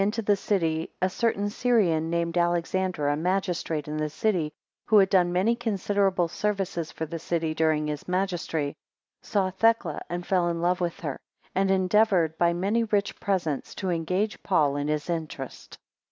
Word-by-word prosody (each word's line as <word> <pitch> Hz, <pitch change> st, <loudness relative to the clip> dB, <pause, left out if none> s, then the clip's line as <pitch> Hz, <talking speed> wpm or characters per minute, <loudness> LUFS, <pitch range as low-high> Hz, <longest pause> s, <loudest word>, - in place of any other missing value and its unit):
to 225 Hz, +1 st, -3 dB
the 205 Hz, 0 st, +3 dB
city, 165 Hz, -5 st, 0 dB
a 185 Hz, -, +2 dB
certain 205 Hz, +1 st, 0 dB
Syrian, 205 Hz, -8 st, +2 dB
named 170 Hz, 0 st, -1 dB
Alexander, 175 Hz, -1 st, 0 dB
a 145 Hz, -, +2 dB
magistrate 175 Hz, -2 st, -1 dB
in 150 Hz, +1 st, -3 dB
the 155 Hz, 0 st, -1 dB
city, 175 Hz, -3 st, 0 dB, 0.4 s
who 215 Hz, -, +5 dB
had 195 Hz, -1 st, +5 dB
done 180 Hz, -2 st, +4 dB
many 190 Hz, +7 st, +2 dB
considerable 200 Hz, -5 st, +1 dB
services 185 Hz, -4 st, -2 dB
for 160 Hz, -, -4 dB
the 165 Hz, +2 st, -6 dB
city 165 Hz, -1 st, -1 dB
during 155 Hz, -1 st, +1 dB
his 150 Hz, -1 st, -4 dB
magistracy, 175 Hz, -5 st, -1 dB, 0.5 s
saw 190 Hz, -3 st, 0 dB
Thecla, 200 Hz, -6 st, +2 dB
and 175 Hz, 0 st, -4 dB
fell 180 Hz, -2 st, +2 dB
in 170 Hz, 0 st, -2 dB
love 180 Hz, +1 st, +1 dB
with 170 Hz, -1 st, -2 dB
her, 145 Hz, -6 st, -4 dB, 0.3 s
and 195 Hz, +1 st, +1 dB
endeavoured 190 Hz, -3 st, +3 dB
by 170 Hz, 0 st, +4 dB
many 200 Hz, +7 st, +1 dB
rich 205 Hz, -2 st, -1 dB
presents 170 Hz, -8 st, -2 dB
to 190 Hz, -2 st, -2 dB
engage 180 Hz, +5 st, -1 dB
Paul 150 Hz, -7 st, +2 dB
in 145 Hz, 0 st, -2 dB
his 150 Hz, -1 st, -1 dB
interest. 160 Hz, -6 st, -5 dB
175 Hz, 170 wpm, -26 LUFS, 160-195 Hz, 0.5 s, who